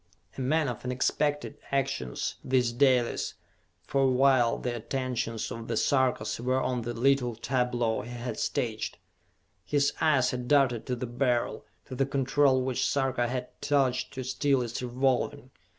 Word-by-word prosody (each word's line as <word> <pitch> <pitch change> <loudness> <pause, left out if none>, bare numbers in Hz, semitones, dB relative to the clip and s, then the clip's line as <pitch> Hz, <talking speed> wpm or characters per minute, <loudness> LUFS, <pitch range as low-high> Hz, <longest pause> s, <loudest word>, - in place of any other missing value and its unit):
A - - -5
man 150 +4 +1
of 120 -3 -5
unexpected 145 +3 -1
actions, 135 - -2
this 125 -2 +2
Dalis, 125 -1 +2 0.5
for 135 -1 +2
while 130 -2 +4
the 125 -1 -3
attentions 120 -2 -3
of 115 0 -6
the - - -1
Sarkas 130 -6 +1
were 130 +2 +1
on 125 -2 -1
the 120 +1 -4
little 125 -1 +2
tableau 120 -1 0
he 120 - -9
had 120 0 -5
staged, - - -2 0.7
his 145 +3 +1
eyes 145 -5 +3
had 125 -1 -4
darted 135 -5 +3
to 125 - -1
the 125 - -4
Beryl, 120 0 -1 0.2
to - - -9
the 135 +1 0
control 135 -1 +2
which 130 -1 -1
Sarka 130 -3 0
had 125 0 -3
touched 135 -3 +1
to 130 - -4
still 135 0 +1
its 120 +1 -4
revolving. 130 +2 -1
130 Hz, 150 wpm, -28 LUFS, 120-135 Hz, 0.7 s, while